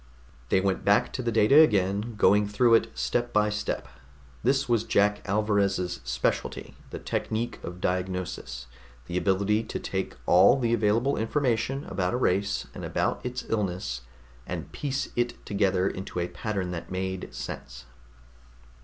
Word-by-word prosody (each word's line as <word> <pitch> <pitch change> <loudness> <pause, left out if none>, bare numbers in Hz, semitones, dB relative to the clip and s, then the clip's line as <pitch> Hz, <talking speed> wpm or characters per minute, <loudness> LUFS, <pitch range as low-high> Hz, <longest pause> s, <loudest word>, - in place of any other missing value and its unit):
They - - +4
went 95 0 0
back 105 +5 +3
to 130 - -2
the 120 -1 -1
data 115 +6 +6
again, 105 -3 +2
going 105 0 +4
through 115 +3 +3
it 115 0 +4
step 120 0 0
by 105 0 +2
step. 105 0 -3 0.5
This 135 +3 +2
was 115 -3 +2
Jack 105 -1 +2
Alvarez's 100 -5 +1
specialty - - -2 0.2
the - - -6
technique 115 +2 -3
of 90 +1 -7
diagnosis, 90 -9 -3 0.4
the 85 - -6
ability 100 +4 +2
to - - -4
take 95 -1 -3
all 95 +9 +6
the 120 -3 +1
available 115 +4 +2
information 130 +2 0
about 95 +2 -1
a - - +1
race 100 -4 +1
and - - -8
about - - -1
its 125 0 -4
illness 90 - -2 0.5
and - - -5
piece 140 -1 -3
it 120 0 -2
together 95 -2 +1
into 95 -2 -4
a 85 - 0
pattern 100 -5 -3
that 85 -1 -6
made 95 0 -4
sense. - - -7
105 Hz, 150 wpm, -27 LUFS, 95-115 Hz, 0.5 s, data